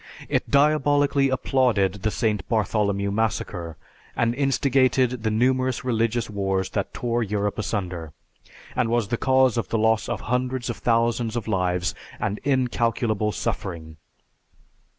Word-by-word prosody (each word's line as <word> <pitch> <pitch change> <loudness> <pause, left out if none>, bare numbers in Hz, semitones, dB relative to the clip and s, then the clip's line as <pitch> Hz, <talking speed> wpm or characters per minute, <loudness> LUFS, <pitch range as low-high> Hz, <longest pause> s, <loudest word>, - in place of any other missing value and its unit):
It - - 0
diabolically 145 -1 +3
applauded 120 -7 +1
the 110 - +1
St. 105 -3 -1
Bartholomew 100 -2 0
Massacre, 100 -6 -2 0.4
and 115 0 +1
instigated 130 -2 +2
the 110 - 0
numerous 130 +3 +1
religious 115 -1 0
wars 95 -2 -1
that - - -2
tore 120 0 -1
Europe 105 -1 -1
asunder, 90 -7 -3 0.6
and 125 -2 +1
was 115 -3 0
the 120 - 0
cause 130 -2 +3
of - - -4
the 115 - 0
loss 110 0 +2
of - - -3
hundreds 125 0 -1
of - - -7
thousands 115 0 +1
of 115 -3 -3
lives 90 -3 0 0.3
and 105 0 -2
incalculable 120 -5 0
suffering. 80 -6 -4
115 Hz, 130 wpm, -24 LUFS, 100-125 Hz, 0.6 s, diabolically